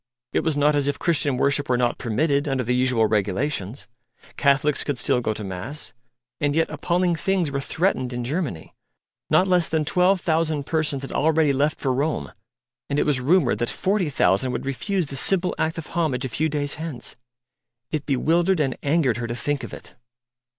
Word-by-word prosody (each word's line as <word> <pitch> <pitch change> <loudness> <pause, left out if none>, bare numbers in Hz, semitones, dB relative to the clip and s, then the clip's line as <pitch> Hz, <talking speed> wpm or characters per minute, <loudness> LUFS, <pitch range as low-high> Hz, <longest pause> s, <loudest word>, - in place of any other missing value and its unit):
It - - +3
was 160 -3 0
not 145 +1 +3
as 145 -1 +1
if 145 - 0
Christian 145 -6 +1
worship 140 +1 +1
were 125 - +3
not 120 -1 0
permitted, 140 +5 0
under 135 -2 0
the 125 +1 0
usual 125 -3 +2
regulations. 105 +2 -1 0.5
Catholics 140 +1 +2
could 145 -3 -2
still 125 0 +1
go 110 - -1
to 105 - -6
mass. 95 +11 -7 0.5
And 145 -1 0
yet 165 0 +1
appalling 175 0 0
things 175 -1 0
were 140 - -1
threatened 135 -3 -1
in 120 0 -3
Germany: 135 - -4 0.6
not 185 - +4
less 180 -3 +3
than 160 -1 0
twelve 180 +3 +3
thousand 160 -4 0
persons 150 -3 -1
had 135 - -6
already 155 -1 +2
left 145 +3 0
for 130 -2 0
Rome; 135 - -2 0.6
and 140 - -1
it - - +2
was 140 -4 +1
rumoured 140 - +3
that 120 - 0
forty 190 -4 0
thousand 130 -2 +2
would - - -4
refuse 180 +7 -1
this 135 -1 -3
simple 185 -2 +3
act 160 +1 0
of 165 - -5
homage 145 -7 -1
a - - -3
few 155 +7 0
days 145 -1 -2
hence. 155 -7 -4 0.8
It 155 -3 -3
bewildered 165 +6 +2
and 135 -4 0
angered 140 -5 +1
her 120 -1 -3
to 120 - -4
think 140 +4 -2
of - - -7
it. - - -11
145 Hz, 190 wpm, -23 LUFS, 125-160 Hz, 0.8 s, not